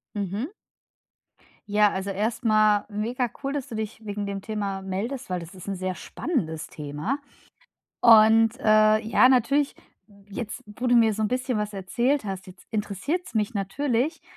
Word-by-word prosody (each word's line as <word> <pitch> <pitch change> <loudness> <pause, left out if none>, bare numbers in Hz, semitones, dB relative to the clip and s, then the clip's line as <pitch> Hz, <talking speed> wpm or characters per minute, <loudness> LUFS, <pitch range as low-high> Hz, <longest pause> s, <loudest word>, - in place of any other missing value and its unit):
Mhm. 205 - -2 1.2
Ja, 210 0 +4
also 190 +1 -3
erstmal 215 0 +2
mega 230 +4 -2
cool, 275 - -2
dass 280 -3 -4
du - - -8
dich 220 0 -5
wegen 205 -1 -4
dem 200 -1 -4
Thema 200 -2 -3
meldest, 205 +8 -4
weil 180 - -1
das 170 +3 -10
ist 185 +1 -10
‘n 200 - -1
sehr 185 0 -3
spannendes 165 - -3
Thema 150 - -4 0.8
und 225 +1 +6
äh, 215 -2 +5
ja, 230 +3 +4
natürlich 275 +3 +2 0.5
jetzt, 215 +4 -6
wo 245 +5 -5
du 245 - +4
mir 225 -2 +5
so 220 - -3
‘n 215 - +2
bisschen 255 -1 -1
was 210 0 -2
erzählt 235 +7 0
hast, 190 -1 -5
jetzt 185 0 -14
interessiert‘s 225 - -3
mich 215 +2 0
natürlich, 245 - -1
215 Hz, 160 wpm, -25 LUFS, 200-245 Hz, 1.2 s, und